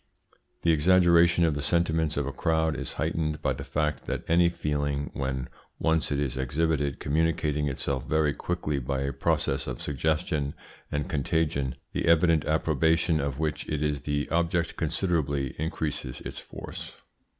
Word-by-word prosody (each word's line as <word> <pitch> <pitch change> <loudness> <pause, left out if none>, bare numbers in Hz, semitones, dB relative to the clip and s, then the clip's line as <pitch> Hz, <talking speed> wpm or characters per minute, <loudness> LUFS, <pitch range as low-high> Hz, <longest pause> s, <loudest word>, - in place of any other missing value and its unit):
The 85 - +4
exaggeration 85 +1 +5
of 80 - +2
the 70 - -3
sentiments 80 0 +1
of 70 - +1
a 70 - -3
crowd 80 +1 +1
is - - -4
heightened 80 -1 -1
by 70 - +2
the 70 +2 -6
fact 75 +1 -2
that - - -2
any 85 +1 +5
feeling 75 -3 -2
when 65 -1 -2 0.3
once 80 -2 +1
it 70 - +1
is 65 -3 -1
exhibited 70 +1 0
communicating 75 -1 +1
itself 70 -1 -2
very 75 -2 +2
quickly 75 -2 -2
by 65 +1 -2
a 70 0 -1
process - - 0
of 65 -1 -4
suggestion 75 0 -1 0.4
and 75 0 -1
contagion, 70 -3 0 0.2
the - - -1
evident 85 -2 +4
approbation 80 +1 +2
of 70 -2 -2
which 75 -1 -2
it 75 -1 -1
is 75 -2 0
the 75 0 -1
object 85 0 +1
considerably 75 -5 0
increases 75 -5 -3
its - - -6
force. - - -8
75 Hz, 155 wpm, -27 LUFS, 70-80 Hz, 0.4 s, exaggeration